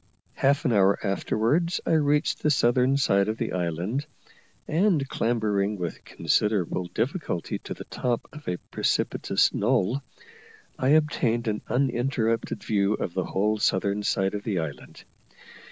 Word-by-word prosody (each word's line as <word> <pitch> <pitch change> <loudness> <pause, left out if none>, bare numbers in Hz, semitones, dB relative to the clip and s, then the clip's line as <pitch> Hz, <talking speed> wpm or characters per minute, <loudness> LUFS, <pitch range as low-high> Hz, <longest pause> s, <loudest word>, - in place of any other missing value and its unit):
Half 140 +4 +1
an 125 - +2
hour 100 -1 +4
afterwards 120 - +1
I - - 0
reached 150 -1 +2
the 150 - +2
southern 125 0 +3
side 100 -7 +2
of 110 +1 -2
the 115 - -2
island, 90 - -2 0.6
and 165 -4 +2
clambering 105 -5 0
with 85 -2 -5
considerable 95 -4 0
difficulty 115 - -2
to - - -7
the - - -8
top 120 -2 -2
of 150 0 -12
a 90 - -1
precipitous - - +1
knoll, 120 +3 +1 0.8
I 130 - +1
obtained 130 -6 +2
an 105 -1 -1
uninterrupted 120 -3 0
view 100 -1 +1
of 85 - -4
the 95 - -1
whole 105 +2 0
southern 100 +1 +1
side 95 -1 0
of 105 0 -4
the 105 -4 -1
island. 80 -4 -6
110 Hz, 140 wpm, -26 LUFS, 100-135 Hz, 0.8 s, hour